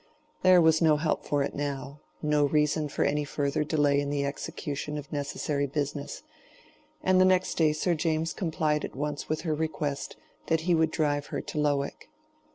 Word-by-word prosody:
There 185 Hz, -1 st, +7 dB
was 160 Hz, 0 st, +4 dB
no 155 Hz, -2 st, +5 dB
help 155 Hz, +1 st, -1 dB
for 145 Hz, -1 st, +1 dB
it -, -, -3 dB
now—no 145 Hz, +1 st, -2 dB
reason 150 Hz, +1 st, +1 dB
for -, -, 0 dB
any 150 Hz, +1 st, +1 dB
further 145 Hz, 0 st, -1 dB
delay 145 Hz, -2 st, +2 dB
in 140 Hz, -, -3 dB
the 145 Hz, -1 st, 0 dB
execution 145 Hz, +1 st, -4 dB
of 145 Hz, 0 st, -8 dB
necessary 145 Hz, 0 st, -1 dB
business. 145 Hz, 0 st, -4 dB, 0.8 s
And 185 Hz, 0 st, +4 dB
the -, -, +6 dB
next 185 Hz, 0 st, +3 dB
day 155 Hz, -2 st, +3 dB
Sir 165 Hz, +4 st, 0 dB
James 160 Hz, 0 st, 0 dB
complied 155 Hz, -4 st, 0 dB
at -, -, -6 dB
once 145 Hz, +1 st, -3 dB
with 155 Hz, 0 st, -1 dB
her 160 Hz, -2 st, -1 dB
request 150 Hz, -2 st, -3 dB, 0.3 s
that 160 Hz, -1 st, +2 dB
he 175 Hz, +2 st, +1 dB
would 160 Hz, -1 st, +3 dB
drive 145 Hz, -2 st, 0 dB
her -, -, -3 dB
to 150 Hz, -, -5 dB
Lowick. 145 Hz, -1 st, -1 dB
150 Hz, 175 wpm, -28 LUFS, 145-160 Hz, 0.8 s, There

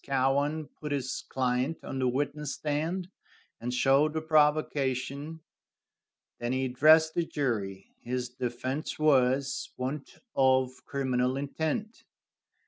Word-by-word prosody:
Cowan 140 Hz, +3 st, +1 dB
put 150 Hz, -1 st, -8 dB
his 135 Hz, -3 st, -2 dB
client 130 Hz, +4 st, 0 dB
on 135 Hz, -, -4 dB
the 130 Hz, -, +2 dB
witness 145 Hz, +3 st, -1 dB
stand, 165 Hz, +5 st, -2 dB, 0.5 s
and 120 Hz, +2 st, -3 dB
showed 135 Hz, +4 st, +3 dB
the 160 Hz, -, -1 dB
provocation. 150 Hz, -1 st, +1 dB, 1.0 s
Then 120 Hz, +1 st, -1 dB
he 130 Hz, 0 st, 0 dB
addressed 155 Hz, +5 st, +5 dB
the 170 Hz, -, +1 dB
jury. 105 Hz, -11 st, -3 dB
His 125 Hz, +1 st, -2 dB
defense 125 Hz, +3 st, -3 dB
was, 135 Hz, -3 st, +2 dB
want 135 Hz, +3 st, -4 dB, 0.2 s
of 130 Hz, -1 st, +2 dB
criminal 130 Hz, -2 st, 0 dB
intent. 160 Hz, +10 st, -3 dB
135 Hz, 115 wpm, -29 LUFS, 130-150 Hz, 1.0 s, addressed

